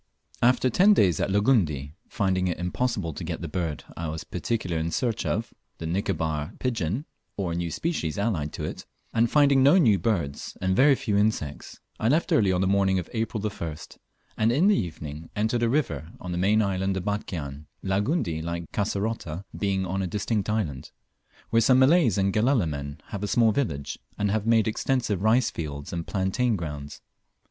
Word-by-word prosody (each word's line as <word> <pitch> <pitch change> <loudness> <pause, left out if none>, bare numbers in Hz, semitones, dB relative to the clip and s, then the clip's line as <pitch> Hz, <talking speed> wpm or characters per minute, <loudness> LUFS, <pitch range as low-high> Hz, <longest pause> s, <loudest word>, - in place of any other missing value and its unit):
After 125 +1 +3
ten 205 - +6
days 90 - +3
at - - 0
Langundi, 95 - +2 0.2
finding 95 -4 0
it 90 - -1
impossible 90 -1 -1
to 85 - -6
get 85 +1 -4
the 85 - -4
bird 80 -2 -3
I 85 - -4
was 80 0 -4
particularly 90 -9 -2
in 85 - -1
search 115 +5 -1
of 115 +1 -2 0.2
(the 80 - -6
Nicobar 80 -4 -1
pigeon, 120 - -2 0.3
or 95 -4 -1
a - - -2
new 85 0 -2
species 85 - -2
allied 95 -9 -1
to - - -5
it), - - -6 0.3
and 115 +1 +3
finding 140 -1 +5
no 140 +7 +6
new 110 - +4
birds, 85 -11 -2
and 95 0 +1
very 135 +5 +6
few 125 -6 -2
insects, 100 -9 -1 0.2
I 110 - +1
left 155 +7 +2
early 100 -4 +4
on 90 0 +1
the 95 - +2
morning 95 -1 +3
of 90 - -4
April 110 -2 -2
1st, 85 -7 -5 0.4
and 110 +2 +3
in 145 +9 +3
the 210 - +5
evening 80 - -5
entered 110 +3 0
a 120 - +2
river 85 - -1
on 90 - -6
the 85 - -2
main 105 +4 +3
island 95 -1 0
of 90 - -4
Batchian 80 -8 -4 0.2
(Langundi, 95 - 0
like 85 0 -5
Kasserota, 100 -4 -2
being 95 -2 0
on 95 +2 -2
a 95 - -1
distinct 105 +2 -1
island), 90 -12 -2 0.6
where 115 - +4
some 125 +3 +5
Malays 130 - +5
and 95 0 +1
Galela 115 -3 +2
men 70 0 -5
have 100 - -5
a 105 - -1
small 115 0 +4
village, 90 - -2 0.2
and 105 -1 0
have 110 0 -1
made 115 -1 +4
extensive 110 -3 0
rice 110 +3 +3
fields 70 -2 -6
and 85 -1 -4
plantain 105 +5 0
grounds. 75 -5 -6
100 Hz, 190 wpm, -26 LUFS, 85-115 Hz, 0.6 s, ten